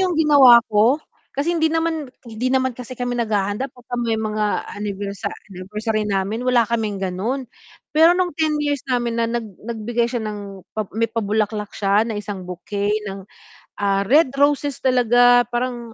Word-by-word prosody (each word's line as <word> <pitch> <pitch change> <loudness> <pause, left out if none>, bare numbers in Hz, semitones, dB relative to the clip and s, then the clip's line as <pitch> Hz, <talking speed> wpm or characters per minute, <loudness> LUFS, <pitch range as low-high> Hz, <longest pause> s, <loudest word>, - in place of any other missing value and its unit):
'yung 365 -2 +1
ginawa 285 -6 +8
ko 225 +6 +3 0.3
kasi 280 +4 -2
hindi 320 -1 +2
naman 325 -5 -1 0.2
hindi 230 +3 -2
naman 260 -2 +1
kasi 250 0 -8
kami 245 0 -2
naghahanda 210 0 -1
'pagka 245 0 -8
may 230 -2 0
mga 215 -1 -1
anniversa 205 0 -4 0.2
anniversary 210 +4 -3
namin 205 +4 -1
wala 245 -2 +3
kaming 220 -4 -1
gano'n. 205 +8 -2 0.5
Pero 325 +3 +7
nung 360 -3 0
10 315 -1 +1
years 290 -2 -1
namin 240 -3 -1
na 230 - +1
nag 235 -1 -2 0.2
nagbigay 235 +1 -1
siya 240 -2 -2
ng 205 -2 -6 0.2
pa 215 - 0
may 230 +2 0
pabulaklak 210 -1 -2
siya 205 +1 +2
ng 225 -2 -4
isang 200 -2 -6
bouquet 200 +3 -3 0.2
ng, 195 0 -7 0.5
ah, 200 -1 +1
red 290 -1 +4
roses 285 0 +1
talaga 245 -1 +4
parang, 240 -1 -3
230 Hz, 160 wpm, -21 LUFS, 210-255 Hz, 0.5 s, ginawa